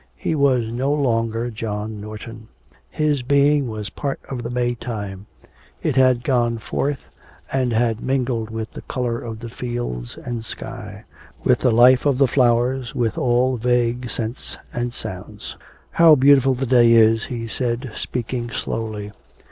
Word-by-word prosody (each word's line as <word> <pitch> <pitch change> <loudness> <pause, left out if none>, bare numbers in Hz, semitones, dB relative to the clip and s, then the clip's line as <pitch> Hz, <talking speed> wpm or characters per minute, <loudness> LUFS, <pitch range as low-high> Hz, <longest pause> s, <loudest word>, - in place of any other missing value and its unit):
He 160 - -1
was 135 -5 +3
no 130 +4 0
longer 115 -4 0
John 105 -1 -4
Norton. 110 +1 -9 0.4
His 150 -3 0
being 140 +1 +3
was 105 -3 -5
part 140 +5 -3
of 130 -3 -4
the 120 - -5
May 120 0 0
time; 105 -4 -6 0.6
it - - 0
had 130 -2 +4
gone 120 -3 +1
forth 135 +5 -3 0.4
and 130 -2 +1
had 115 -1 +1
mingled 125 -4 -1
with 110 0 -5
the - - -8
colour 120 -2 -2
of 115 -2 -6
the 120 - -6
fields 120 - -5
and 120 -2 -5
sky; - - -7 0.4
with - - +3
the - - +3
life 125 +4 +6
of 140 -3 +2
the 135 0 +4
flowers, 125 0 +1
with 115 -2 0
all 125 +1 +2
vague 120 +1 0
scents 115 +3 -4 0.2
and 120 0 -2
sounds. 95 -6 -7 0.4
'How 165 -2 +7
beautiful 135 -1 +5
the 130 +2 -2
day 120 -2 +5
is,' 115 -1 +5
he 115 -2 -5
said, 120 +1 -2
speaking 120 0 -4
slowly. 110 -3 -4
120 Hz, 155 wpm, -21 LUFS, 115-130 Hz, 0.6 s, How